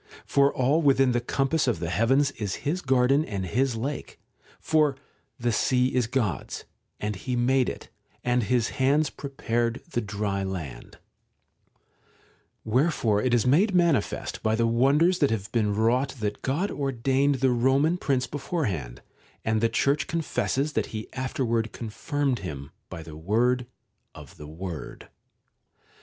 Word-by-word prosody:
For 140 Hz, 0 st, +3 dB
all 140 Hz, +6 st, +2 dB
within 135 Hz, -3 st, +4 dB
the 120 Hz, 0 st, +1 dB
compass 135 Hz, +4 st, 0 dB
of 120 Hz, -, +1 dB
the 85 Hz, 0 st, -3 dB
heavens 135 Hz, -, +3 dB
is 105 Hz, -8 st, -4 dB
his 170 Hz, +6 st, 0 dB
garden 135 Hz, +1 st, +3 dB
and 100 Hz, -9 st, -4 dB
his 125 Hz, +6 st, 0 dB
lake; 135 Hz, +5 st, -5 dB, 0.4 s
for 155 Hz, -3 st, +2 dB, 0.2 s
' -, -, -44 dB
the 120 Hz, 0 st, +1 dB
sea 125 Hz, +3 st, +2 dB
is 125 Hz, -3 st, +1 dB
God's, 110 Hz, -, -2 dB, 0.3 s
and 105 Hz, 0 st, -2 dB
He 125 Hz, +6 st, -3 dB
made 125 Hz, +1 st, +2 dB
it, -, -, -8 dB, 0.3 s
and 125 Hz, 0 st, +2 dB
His 115 Hz, +1 st, +1 dB
hands 140 Hz, +3 st, +2 dB
prepared 120 Hz, -4 st, -2 dB
the 120 Hz, -, 0 dB
dry 100 Hz, -2 st, -2 dB
land\ 90 Hz, -9 st, -6 dB, 1.7 s
Wherefore 115 Hz, -3 st, +2 dB
it 130 Hz, -, 0 dB
is 120 Hz, -1 st, +3 dB
made 185 Hz, -, +3 dB
manifest 170 Hz, -, +1 dB
by 110 Hz, 0 st, +1 dB
the 115 Hz, +1 st, +2 dB
wonders 140 Hz, +10 st, +3 dB
that 145 Hz, -, +3 dB
have 105 Hz, -3 st, -3 dB
been 105 Hz, -3 st, +1 dB
wrought 120 Hz, +6 st, +1 dB
that 105 Hz, -1 st, -3 dB
God 160 Hz, +10 st, -1 dB
ordained 135 Hz, +1 st, +1 dB
the 130 Hz, 0 st, +2 dB
Eoman 135 Hz, +8 st, +2 dB
Prince 130 Hz, -5 st, 0 dB
beforehand, 115 Hz, -, -3 dB, 0.4 s
and 110 Hz, -1 st, +1 dB
the 115 Hz, -, +3 dB
Church 140 Hz, +5 st, +1 dB
confesses 155 Hz, -3 st, -1 dB
that -, -, 0 dB
He 110 Hz, -1 st, -7 dB
afterward 115 Hz, -4 st, -1 dB
confirmed 135 Hz, +4 st, -2 dB
him 70 Hz, -7 st, -7 dB, 0.2 s
by 80 Hz, -, -7 dB
the 80 Hz, -1 st, -10 dB
word 120 Hz, +9 st, +1 dB, 0.5 s
of -, -, -12 dB
the 75 Hz, -, -9 dB
Word. 85 Hz, +1 st, -7 dB
125 Hz, 150 wpm, -26 LUFS, 110-140 Hz, 1.7 s, within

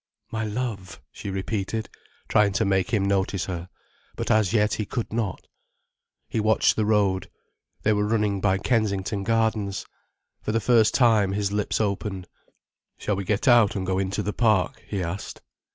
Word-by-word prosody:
"My 110 Hz, 0 st, -2 dB
love," 105 Hz, -4 st, -4 dB
she -, -, -7 dB
repeated, 100 Hz, +3 st, -3 dB, 0.4 s
trying 105 Hz, -2 st, +3 dB
to -, -, +1 dB
make 95 Hz, -2 st, +1 dB
him 100 Hz, -4 st, +1 dB
notice 95 Hz, -1 st, 0 dB
her. 90 Hz, -1 st, -5 dB, 0.5 s
But -, -, -2 dB
as 110 Hz, -4 st, +3 dB
yet 105 Hz, -2 st, +2 dB
he 110 Hz, -, -1 dB
could 120 Hz, -4 st, -4 dB
not. 110 Hz, -5 st, -2 dB, 0.8 s
He -, -, -2 dB
watched 110 Hz, +1 st, +3 dB
the 110 Hz, -1 st, 0 dB
road. 95 Hz, -4 st, +1 dB, 0.5 s
They 110 Hz, -, +3 dB
were 105 Hz, 0 st, +1 dB
running 105 Hz, -3 st, 0 dB
by 95 Hz, -1 st, +2 dB
Kensington 100 Hz, -2 st, 0 dB
Gardens. 110 Hz, -2 st, 0 dB, 0.6 s
For -, -, -2 dB
the 115 Hz, -, +2 dB
first 115 Hz, -1 st, +3 dB
time 110 Hz, -6 st, +4 dB
his 100 Hz, 0 st, -1 dB
lips 105 Hz, 0 st, -1 dB
opened. 100 Hz, -3 st, -2 dB, 0.7 s
"Shall 105 Hz, -, -1 dB
we 100 Hz, -, -3 dB
get 105 Hz, +7 st, 0 dB
out 120 Hz, -5 st, +5 dB
and 95 Hz, -2 st, -2 dB
go 95 Hz, 0 st, 0 dB
into 95 Hz, +2 st, -1 dB
the 105 Hz, -, -2 dB
park," 110 Hz, -7 st, +1 dB
he 100 Hz, -3 st, -2 dB
asked. 85 Hz, +4 st, -6 dB
105 Hz, 170 wpm, -25 LUFS, 95-110 Hz, 0.8 s, out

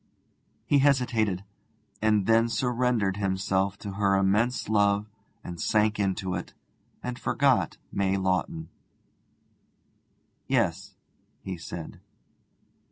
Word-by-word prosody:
He 145 Hz, -, +3 dB
hesitated, 120 Hz, -9 st, +2 dB, 0.6 s
and 105 Hz, -2 st, +3 dB
then 115 Hz, +1 st, +4 dB
surrendered 120 Hz, -5 st, 0 dB
himself 95 Hz, 0 st, 0 dB
to 100 Hz, -, -6 dB
her 100 Hz, 0 st, +2 dB
immense 105 Hz, +6 st, +1 dB
love 105 Hz, -1 st, +2 dB, 0.4 s
and 85 Hz, -1 st, -7 dB
sank 110 Hz, 0 st, +2 dB
into 95 Hz, -2 st, -1 dB
it, 90 Hz, -, -5 dB, 0.5 s
and 125 Hz, 0 st, -4 dB
forgot 135 Hz, -3 st, +2 dB
May 100 Hz, -1 st, +1 dB
Lawton. 90 Hz, -4 st, -1 dB, 1.8 s
'Yes,' -, -, 0 dB, 0.5 s
he 95 Hz, -, -4 dB
said. 85 Hz, -1 st, -8 dB
100 Hz, 100 wpm, -27 LUFS, 95-115 Hz, 1.8 s, then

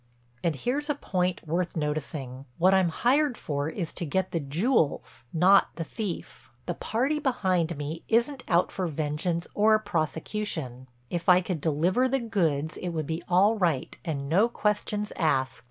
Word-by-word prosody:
"And 165 Hz, -3 st, +1 dB
here's 280 Hz, -, -2 dB
a 295 Hz, -, +1 dB
point 180 Hz, -, -2 dB
worth 170 Hz, +2 st, -1 dB
noticing: 145 Hz, -3 st, -3 dB
What 185 Hz, +3 st, +4 dB
I'm 190 Hz, -2 st, +4 dB
hired 260 Hz, -, +2 dB
for 145 Hz, 0 st, -2 dB
is 165 Hz, -1 st, -4 dB
to 180 Hz, -, -4 dB
get 185 Hz, +4 st, -1 dB
the 165 Hz, -, 0 dB
jewels, 160 Hz, -, 0 dB
not 185 Hz, +4 st, +5 dB
the 165 Hz, -, -3 dB
thief. 205 Hz, +1 st, -6 dB, 0.2 s
The -, -, -2 dB
party 265 Hz, +7 st, -1 dB
behind 185 Hz, -, 0 dB
me 150 Hz, +3 st, -4 dB
isn't 245 Hz, +4 st, +1 dB
out 175 Hz, +1 st, +2 dB
for 185 Hz, -2 st, -2 dB
vengeance 160 Hz, +3 st, -2 dB
or 215 Hz, +1 st, +5 dB
prosecution. 160 Hz, -, -3 dB, 0.2 s
If 175 Hz, +1 st, -1 dB
I 180 Hz, 0 st, +8 dB
could 180 Hz, -4 st, -3 dB
deliver 175 Hz, -, +2 dB
the 270 Hz, +1 st, +1 dB
goods 160 Hz, -, 0 dB
it 180 Hz, -, -4 dB
would 160 Hz, -3 st, -2 dB
be 160 Hz, +3 st, -3 dB
all 195 Hz, +5 st, +5 dB
right 165 Hz, -8 st, 0 dB
and 140 Hz, -4 st, -3 dB
no 195 Hz, +10 st, +3 dB
questions 210 Hz, -1 st, -1 dB
asked. 135 Hz, -6 st, +1 dB
175 Hz, 165 wpm, -27 LUFS, 155-210 Hz, 0.2 s, I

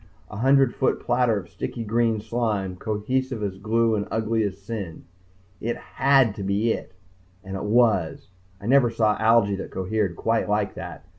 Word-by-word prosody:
A 105 Hz, -, -7 dB
hundred 135 Hz, +1 st, +4 dB
foot 130 Hz, -, 0 dB
platter 120 Hz, -2 st, +1 dB
of 95 Hz, -4 st, -6 dB
sticky 115 Hz, -, -5 dB
green 115 Hz, 0 st, +1 dB
slime, 110 Hz, -4 st, -2 dB
cohesive 110 Hz, +4 st, -2 dB
as 95 Hz, -2 st, -4 dB
glue 115 Hz, +2 st, +1 dB
and 100 Hz, -1 st, -1 dB
ugly 110 Hz, 0 st, 0 dB
as 100 Hz, -2 st, -2 dB
sin. 100 Hz, -4 st, -6 dB, 0.5 s
It 120 Hz, +1 st, -2 dB
had 135 Hz, -4 st, +2 dB
to 100 Hz, -, -4 dB
be 100 Hz, +4 st, +1 dB
it -, -, -8 dB, 0.5 s
and 95 Hz, -1 st, -6 dB
it 95 Hz, -, -4 dB
was. 105 Hz, -7 st, +2 dB, 0.3 s
I 100 Hz, -, -11 dB
never 130 Hz, 0 st, +4 dB
saw 110 Hz, -2 st, +2 dB
algae 110 Hz, -2 st, +4 dB
that 95 Hz, -, -6 dB
cohered 95 Hz, -1 st, -1 dB
quite 115 Hz, +3 st, 0 dB
like 105 Hz, -1 st, 0 dB
that. 85 Hz, -3 st, -8 dB
110 Hz, 170 wpm, -24 LUFS, 100-115 Hz, 0.5 s, hundred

